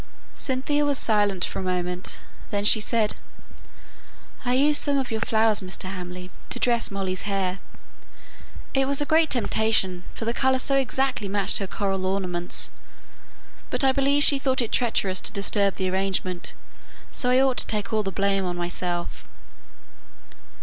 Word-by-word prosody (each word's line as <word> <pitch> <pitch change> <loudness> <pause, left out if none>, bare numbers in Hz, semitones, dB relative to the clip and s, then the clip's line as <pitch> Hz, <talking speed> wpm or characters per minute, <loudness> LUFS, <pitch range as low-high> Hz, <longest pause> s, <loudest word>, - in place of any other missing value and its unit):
Cynthia 275 +3 0
was 285 -2 +2
silent 205 -6 +2
for - - -5
a - - -3
moment; 180 0 -3 0.3
then 205 0 -1
she 215 +1 +5
said, 215 0 +1 1.3
"I 245 0 +1
used 290 +3 +4
some 285 -1 +3
of 265 -3 -2
your 220 -1 -2
flowers, 220 -1 +2
Mr. 185 0 -5
Hamley, 180 -1 -7 0.2
to - - -4
dress 235 -1 +1
Molly's 195 0 -3
hair. 190 -1 -1 1.1
It 270 -1 +2
was 280 0 +2
a 290 - 0
great 315 0 +3
temptation, 220 -6 +1
for 225 - -5
the 230 - 0
colour 265 +1 +2
so 275 +2 +1
exactly 265 -4 0
matched 200 0 +1
her 195 - -3
coral 195 -2 -2
ornaments; 180 -2 -1 1.0
but - - 0
I 265 - +5
believe 275 +2 +3
she 280 -1 +6
thought 265 -1 0
it 235 -3 0
treacherous 200 -6 +1
to - - -1
disturb 200 -1 0
the 190 - -2
arrangement, 190 -2 -2 0.6
so 250 - +1
I 250 +1 +5
ought 265 -2 +2
to - - +2
take 210 0 -1
all 215 - +2
the 195 -2 -3
blame 195 0 0
on 175 -1 -3
myself." 175 0 -3
210 Hz, 165 wpm, -24 LUFS, 185-260 Hz, 1.3 s, she